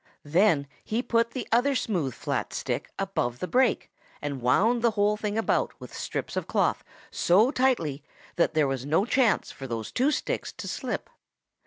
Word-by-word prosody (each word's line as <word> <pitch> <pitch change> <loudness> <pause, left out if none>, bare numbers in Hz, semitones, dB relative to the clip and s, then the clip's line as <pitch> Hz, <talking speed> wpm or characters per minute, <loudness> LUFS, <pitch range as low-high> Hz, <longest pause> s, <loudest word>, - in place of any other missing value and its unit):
Then 160 -1 +3 0.2
he 230 +3 -1
put 230 -2 +2
the 255 - -5
other 255 +4 +3
smooth 170 - -1
flat - - -3
stick - - -3
above 185 -11 -1
the 180 - -4
break 250 +4 +2 0.3
and 140 -3 -4
wound 220 - +3
the 235 - +4
whole 210 +1 +2
about 215 +1 0
with - - -10
strips - - -4
of - - -2
cloth - - +1 0.3
so 210 +9 +4
tightly 235 - +1 0.3
that 170 - +1
there 155 -2 +3
was 135 -2 -2
no 160 +8 +2
chance 245 -3 +2
for 135 - -8
those 115 -3 -4
two 260 +4 +2
sticks 300 - -2
to - - -7
slip. - - -3
205 Hz, 170 wpm, -27 LUFS, 145-235 Hz, 0.3 s, the